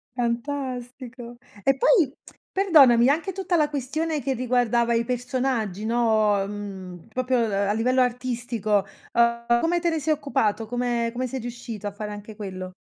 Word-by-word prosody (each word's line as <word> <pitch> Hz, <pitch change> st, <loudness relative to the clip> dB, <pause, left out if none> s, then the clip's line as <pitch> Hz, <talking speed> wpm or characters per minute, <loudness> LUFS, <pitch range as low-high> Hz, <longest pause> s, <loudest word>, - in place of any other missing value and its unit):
Fantastico. 245 Hz, -1 st, -4 dB, 0.3 s
E 270 Hz, 0 st, +3 dB
poi, 320 Hz, -, +4 dB, 0.4 s
perdonami, 275 Hz, -11 st, +6 dB
anche 330 Hz, +6 st, +1 dB
tutta 375 Hz, -2 st, -1 dB
la 300 Hz, -1 st, +2 dB
questione 300 Hz, +2 st, -2 dB
che 270 Hz, -, -1 dB
riguardava 240 Hz, -1 st, +1 dB
i 230 Hz, 0 st, +2 dB
personaggi, 245 Hz, -4 st, -2 dB
no, 220 Hz, -3 st, +2 dB
uhm, 195 Hz, -2 st, -7 dB
proprio 255 Hz, +1 st, 0 dB, 0.3 s
a 205 Hz, -, +1 dB
livello 255 Hz, +4 st, +2 dB
artistico, 240 Hz, -5 st, 0 dB, 0.3 s
uhm, 235 Hz, 0 st, +3 dB
come 345 Hz, +1 st, +1 dB
te 340 Hz, 0 st, +1 dB
ne 320 Hz, -1 st, -1 dB
sei 310 Hz, +2 st, +1 dB
occupato? 250 Hz, -7 st, 0 dB
Come 240 Hz, -1 st, -1 dB
come 255 Hz, +1 st, -3 dB
sei 260 Hz, +2 st, -4 dB
riuscito 235 Hz, -3 st, -6 dB
a -, -, -3 dB
fare 210 Hz, +1 st, -6 dB
anche 210 Hz, +1 st, -9 dB
quello? 185 Hz, -3 st, -6 dB
240 Hz, 150 wpm, -24 LUFS, 220-265 Hz, 0.4 s, perdonami